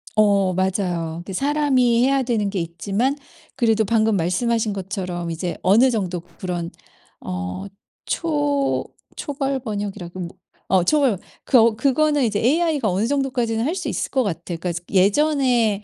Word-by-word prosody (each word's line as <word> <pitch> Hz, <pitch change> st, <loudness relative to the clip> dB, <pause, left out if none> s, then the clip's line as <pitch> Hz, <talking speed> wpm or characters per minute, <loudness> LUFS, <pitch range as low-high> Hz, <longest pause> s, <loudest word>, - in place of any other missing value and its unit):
어 200 Hz, -3 st, +3 dB
맞아요. 180 Hz, -3 st, -1 dB
근데 195 Hz, -, -7 dB
사람이 265 Hz, -2 st, +2 dB
해야 275 Hz, 0 st, +2 dB
되는 225 Hz, -5 st, 0 dB
게 195 Hz, -, -2 dB
있지만 195 Hz, -, -1 dB, 0.4 s
그래도 225 Hz, -3 st, +2 dB
방금 220 Hz, 0 st, +2 dB
말씀하신 215 Hz, +5 st, 0 dB
것처럼 185 Hz, -3 st, -4 dB
이제 170 Hz, +2 st, -4 dB
어느 225 Hz, +8 st, +5 dB
정도 185 Hz, -6 st, -2 dB, 0.2 s
그런 175 Hz, -2 st, -3 dB, 0.5 s
어 90 Hz, -, -5 dB, 0.4 s
초 290 Hz, -4 st, 0 dB, 0.3 s
초벌 275 Hz, -2 st, -2 dB
번역이라고 200 Hz, -6 st, -5 dB, 0.4 s
어 190 Hz, -2 st, +3 dB
초벌 270 Hz, -, +3 dB, 0.3 s
그 260 Hz, -, +4 dB
어 230 Hz, -1 st, +5 dB
그거는 290 Hz, +2 st, +2 dB
이제 210 Hz, -3 st, 0 dB
AI가 295 Hz, -2 st, +2 dB
어느 190 Hz, +5 st, 0 dB
정도까지는 250 Hz, -4 st, 0 dB
할 320 Hz, +6 st, -1 dB
수 -, -, -4 dB
있을 -, -, -2 dB
것 265 Hz, -2 st, +2 dB
같아요. 175 Hz, -3 st, -4 dB
그러니까 175 Hz, 0 st, -2 dB
스 175 Hz, -, -5 dB
예전에 230 Hz, 0 st, +2 dB
220 Hz, 310 characters per minute, -22 LUFS, 185-265 Hz, 0.5 s, 어느